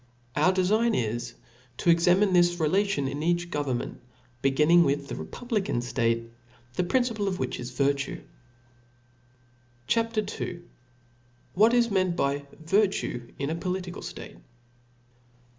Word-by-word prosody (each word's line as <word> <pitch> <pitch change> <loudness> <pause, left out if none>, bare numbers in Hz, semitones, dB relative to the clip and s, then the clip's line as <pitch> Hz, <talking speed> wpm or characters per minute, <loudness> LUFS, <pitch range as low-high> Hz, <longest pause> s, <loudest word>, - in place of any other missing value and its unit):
Our 155 +5 +4
defign 215 +5 +2
is 120 +1 -3 0.4
to 170 - +3
examine 180 +4 +4
this 175 0 +4
relation 165 -2 +1
in 140 +2 -4
each 175 +1 0
government, 140 -6 -3 0.4
beginning 150 +6 +5
with 140 -1 -1
the - - -4
republican 220 - -3
ftate, 115 -1 0 0.5
whofe 180 - -1
principle 235 -5 +1
is 185 -10 -3
virtue. 140 +2 -1 1.6
CHAP. 230 - 0 0.2
II. 175 -1 -4 0.9
What 220 +5 +5
is 235 -2 +3
meant 185 -3 +1
by 140 -2 -1 0.2
Virtue 190 - 0
in 140 +2 -2
a - - -1
Political 180 0 -4
State. - - -8
175 Hz, 115 wpm, -27 LUFS, 140-195 Hz, 1.6 s, beginning